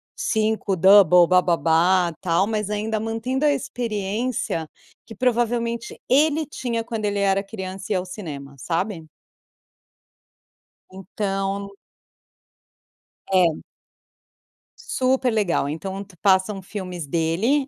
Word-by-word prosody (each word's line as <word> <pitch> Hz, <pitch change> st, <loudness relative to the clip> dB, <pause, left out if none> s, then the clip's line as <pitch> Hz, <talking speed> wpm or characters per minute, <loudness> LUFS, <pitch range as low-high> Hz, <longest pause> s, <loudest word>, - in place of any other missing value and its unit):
5 215 Hz, -2 st, 0 dB
double 180 Hz, -1 st, +7 dB
bababa 175 Hz, 0 st, +3 dB
tal, 175 Hz, +2 st, +2 dB
mas 215 Hz, -2 st, -2 dB
ainda 215 Hz, +1 st, -1 dB
mantendo 230 Hz, +6 st, -2 dB
a 295 Hz, -, +5 dB
experiência 220 Hz, -, -2 dB, 0.4 s
que 225 Hz, -, -11 dB
provavelmente 235 Hz, 0 st, -1 dB
ele 305 Hz, +3 st, +3 dB
tinha 235 Hz, -5 st, -3 dB
quando 225 Hz, -2 st, -4 dB
ele 205 Hz, -1 st, -1 dB
era 195 Hz, 0 st, +2 dB
criança 190 Hz, -2 st, -7 dB
e -, -, +1 dB
ia 185 Hz, -, +1 dB
ao 180 Hz, -, -5 dB
cinema, 145 Hz, -8 st, -8 dB
sabe? 165 Hz, -, -3 dB, 1.8 s
Então 195 Hz, +1 st, -3 dB, 1.6 s
É. 175 Hz, -4 st, +3 dB, 1.2 s
Super 260 Hz, 0 st, +1 dB
legal 200 Hz, -10 st, +1 dB
então 190 Hz, +6 st, -5 dB
te 195 Hz, -2 st, -19 dB
passam 190 Hz, +2 st, +2 dB
filmes 180 Hz, -4 st, -6 dB
dele, 170 Hz, -, +1 dB
200 Hz, 105 wpm, -23 LUFS, 180-225 Hz, 1.8 s, double